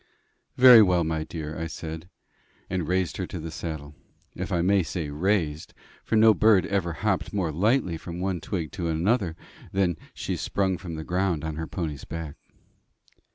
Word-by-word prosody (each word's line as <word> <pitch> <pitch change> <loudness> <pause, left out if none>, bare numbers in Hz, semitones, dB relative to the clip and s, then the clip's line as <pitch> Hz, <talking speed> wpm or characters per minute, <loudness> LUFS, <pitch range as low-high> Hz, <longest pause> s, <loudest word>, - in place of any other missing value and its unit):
"Very 125 -3 +10
well, 90 -4 +4
my 80 -1 -1
dear," 80 -1 -6
I 80 - -2
said, 80 +1 -7 0.6
and 90 -4 -1
raised 90 -2 0
her - - -3
to - - -6
the 80 +1 -6
saddle 80 -2 -6 0.4
if - - -5
I 85 -1 +1
may 100 +1 +4
say 80 -2 -4
raised, 80 -1 -1 0.3
for - - -1
no 110 0 +7
bird 105 -3 +4
ever 95 -4 -1
hopped 100 -1 0
more 95 -6 0
lightly 95 - +1
from 85 +2 -7
one 90 -2 -2
twig 85 -2 -3
to 90 -4 -3
another 85 +2 +1 0.4
than 95 -4 +1 0.2
she - - -3
sprung 95 -2 -1
from 85 -3 -6
the 80 - -5
ground 90 -2 0
on 80 -1 -3
her 80 0 -4
pony's 75 -2 -4
back. 80 -3 -6
85 Hz, 175 wpm, -26 LUFS, 80-95 Hz, 0.6 s, Very